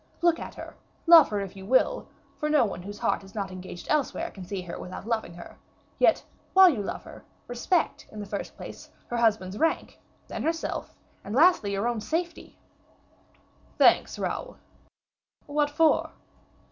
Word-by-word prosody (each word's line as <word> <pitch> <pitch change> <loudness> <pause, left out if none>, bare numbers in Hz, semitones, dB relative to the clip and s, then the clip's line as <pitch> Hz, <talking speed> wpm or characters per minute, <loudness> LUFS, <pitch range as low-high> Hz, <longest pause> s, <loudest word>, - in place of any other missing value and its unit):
Look 340 -1 +4
at - - -8
her, - - -9 0.3
love 330 -3 +9
her, 205 -1 -1
if 195 0 -7
you 190 - -10
will, 255 +7 +2 0.3
for 300 - -1
no 300 -5 +4
one 195 -4 -5
whose 205 +3 -8
heart - - 0
is 195 +2 -15
not 200 -2 -3
engaged 185 -1 -9
elsewhere 300 -3 0
can 190 - -10
see 190 0 -5
her 175 - -7
without 185 +2 -8
loving 220 -7 -2
her. 175 - -11 0.4
Yet, - - +4 0.3
while 380 -1 +9
you 235 -8 -3
love 200 - -5
her, - - -12 0.2
respect, 245 +8 -1
in 215 - -9
the 205 - -5
first 200 0 -6
place, - - -10 0.2
her 240 - -2
husband's 215 -4 +1
rank, 325 0 0 0.3
then - - -5
herself, 325 0 -2 0.3
and 205 +3 -5
lastly, 300 - +4
your 200 +4 0
own 235 -2 -1
safety." 335 +9 -4 1.2
"Thanks, - - +4
Raoul." - - -4 0.9
"What 290 0 0
for?" 310 +2 +3
225 Hz, 170 wpm, -27 LUFS, 195-305 Hz, 1.2 s, love